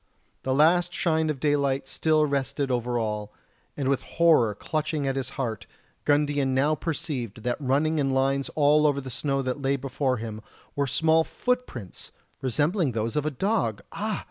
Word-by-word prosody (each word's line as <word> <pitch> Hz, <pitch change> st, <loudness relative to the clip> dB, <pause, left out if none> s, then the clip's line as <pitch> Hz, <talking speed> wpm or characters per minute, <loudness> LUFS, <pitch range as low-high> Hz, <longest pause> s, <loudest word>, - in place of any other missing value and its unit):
A 130 Hz, -, 0 dB
last 170 Hz, +5 st, +4 dB
shine 160 Hz, -2 st, +1 dB
of 150 Hz, -3 st, -2 dB
daylight 140 Hz, -2 st, +1 dB
still 155 Hz, +2 st, +2 dB
rested 140 Hz, -1 st, -1 dB
over 120 Hz, 0 st, 0 dB
all, 105 Hz, -2 st, -2 dB, 0.5 s
and 140 Hz, -2 st, -1 dB
with 140 Hz, -1 st, +1 dB
horror 155 Hz, -11 st, +3 dB
clutching 155 Hz, +2 st, -2 dB
at 135 Hz, -1 st, 0 dB
his 135 Hz, -2 st, -2 dB
heart 115 Hz, -6 st, -3 dB, 0.4 s
Gundian 145 Hz, -2 st, +2 dB
now 145 Hz, +4 st, +3 dB
perceived 145 Hz, -, -4 dB
that 125 Hz, +3 st, -2 dB
running 145 Hz, +4 st, +1 dB
in 135 Hz, -1 st, +1 dB
lines 135 Hz, +1 st, +1 dB
all 150 Hz, 0 st, +5 dB
over 140 Hz, -1 st, +1 dB
the 130 Hz, -1 st, -7 dB
snow 135 Hz, +2 st, -1 dB
that 130 Hz, +2 st, -3 dB
lay 135 Hz, 0 st, +1 dB
before 135 Hz, -1 st, -1 dB
him 110 Hz, -1 st, -6 dB, 0.3 s
were 140 Hz, -1 st, 0 dB
small 160 Hz, +4 st, +3 dB
footprints 245 Hz, -, -3 dB, 0.3 s
resembling 145 Hz, -, +1 dB
those 115 Hz, +2 st, -2 dB
of 150 Hz, 0 st, 0 dB
a -, -, +3 dB
dog! 150 Hz, -, -1 dB
Ah! 215 Hz, 0 st, -2 dB
140 Hz, 170 wpm, -26 LUFS, 130-155 Hz, 0.5 s, all